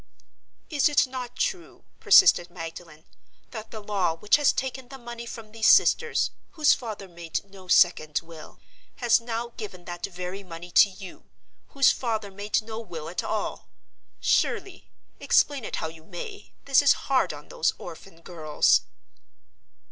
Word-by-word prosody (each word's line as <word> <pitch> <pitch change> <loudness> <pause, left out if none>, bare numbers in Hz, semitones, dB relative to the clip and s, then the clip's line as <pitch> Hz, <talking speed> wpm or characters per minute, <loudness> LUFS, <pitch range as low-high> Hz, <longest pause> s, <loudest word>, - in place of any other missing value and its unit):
"Is 295 -1 +3
it 295 - +4
not 255 -2 -7
true," 360 -2 -3 0.2
persisted 180 - +6
Magdalen, 165 -2 -9 0.5
"that 220 -2 -8
the 220 - -8
law 195 -5 -1
which 210 - +3
has 295 -2 +4
taken 260 -1 -4
the 270 +1 -10
money 235 -1 -8
from 225 -3 -9
these 220 0 0
sisters, 470 -1 +4 0.2
whose 305 -3 +4
father 215 -5 -6
made 170 0 -5
no 190 -1 -15
second 165 -4 +3
will, 165 -2 -13 0.4
has 240 -2 +3
now 235 0 -4
given 185 -5 -8
that 175 -1 -8
very 180 +1 -6
money 175 -2 -10
to 200 - +6
you, 190 -1 -12 0.4
whose 275 -2 +4
father 220 -5 -3
made 205 +2 -2
no 220 0 -6
will 165 -8 -7
at 175 - -3
all? - - -3 0.5
Surely, 390 -3 0 0.3
explain 285 -4 +2
it - - -4
how - - -3
you 160 0 -12
may, 205 - -9
this 275 -1 +5
is 285 - +6
hard 270 -2 +2
on - - -11
those - - 0
orphan 165 -4 -11
girls?" 155 -4 +2
210 Hz, 155 wpm, -26 LUFS, 175-250 Hz, 0.5 s, persisted